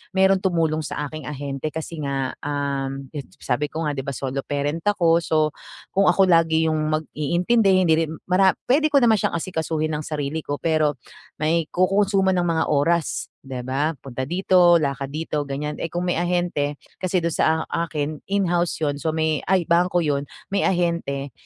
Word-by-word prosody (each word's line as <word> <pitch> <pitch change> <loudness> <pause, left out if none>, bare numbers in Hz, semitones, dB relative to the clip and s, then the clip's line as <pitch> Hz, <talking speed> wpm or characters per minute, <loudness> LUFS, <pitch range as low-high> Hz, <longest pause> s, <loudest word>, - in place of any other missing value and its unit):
mayro'ng 190 0 +4
tumulong 165 -4 +1
sa 150 0 -4
aking 155 +1 -8
ahente. 140 0 -4
Kasi 160 0 -6
nga, 135 -2 -1
um, 140 -1 -3
'yon, 140 -3 -4
sa 125 - 0
sabi 150 +3 -2
ko 160 - -3
nga, - - 0
'di 135 - -3
ba 140 - -4
solo 135 +1 -3
parent 145 +2 -2
ako. 170 -5 +4
So, 160 - -1 0.6
kung 195 +1 +4
ako 195 -1 +3
lagi 160 -2 +3
yung 155 - +1
mag-iintindi, 175 +8 +1
hindi 165 -3 +4
rin 160 0 -5
mara 185 +1 +5 0.2
puwede 295 +5 +4
ko 280 - +6
naman 225 -2 +5
siyang - - 0
asikasuhin 160 -2 -2
nang 150 - -4
sarili 150 0 -3
ko. 145 - -3
Pero 155 -3 +1 0.4
may 160 +2 +1
kokonsumo 195 +1 +2
ng 175 - +1
mga 165 -1 +1
oras, 155 +3 +1 0.2
'di 135 -2 -6
ba? 145 +4 0
Punta 130 -1 -5
dito, 180 -1 +5
lakad 140 -2 -2
dito, 155 0 -2
ganiyan. 150 +2 -4
Eh, 165 - -2
kung 175 +1 -2
may 175 - +1
ahente, 175 -5 -1 0.2
kasi 185 0 0
do'n 170 0 -1
sa - - +2 0.2
a 165 - -1
akin, 150 -1 -3
in-house 175 -3 +1
'yon, 145 -1 +1
so 160 - 0
may 160 -2 0
ay, 190 -2 +3
bangko 175 +1 +3
'yon, 140 -1 -1 0.2
may 195 0 +1
ahente. 170 -6 0
160 Hz, 185 wpm, -23 LUFS, 145-175 Hz, 0.6 s, ko